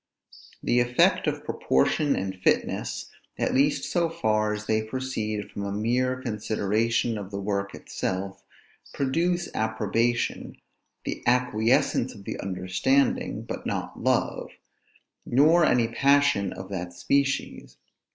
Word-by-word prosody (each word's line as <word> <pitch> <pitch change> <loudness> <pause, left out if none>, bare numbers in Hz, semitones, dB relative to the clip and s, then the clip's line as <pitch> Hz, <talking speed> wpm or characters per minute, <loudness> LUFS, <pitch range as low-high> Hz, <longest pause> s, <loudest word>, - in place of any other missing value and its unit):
The 120 - +2
effect 120 0 +3
of - - -2
proportion 140 - +1
and 95 0 -3
fitness, 90 - -1 0.3
at - - 0
least 140 +3 +2
so 170 -2 0
far 110 -8 +1
as 105 0 -4
they 110 0 +1
proceed 110 -3 -4
from 100 - -5
a 100 - -3
mere 125 +5 0
consideration 110 0 0
of 100 -2 -7
the 100 -1 -5
work 100 0 -2
itself, 95 +1 -4 0.5
produce 170 +6 0
approbation, 110 +2 -1 0.5
the - - -4
acquiescence 120 0 +2
of 100 - -12
the - - -5
understanding, 95 +9 0
but - - -6
not - - -4
love, - - 0 0.7
nor 155 +7 +4
any 120 -2 +3
passion 135 -5 +3
of 95 +1 -8
that 90 -3 -5
species. 140 +8 -1
110 Hz, 120 wpm, -26 LUFS, 100-130 Hz, 0.7 s, nor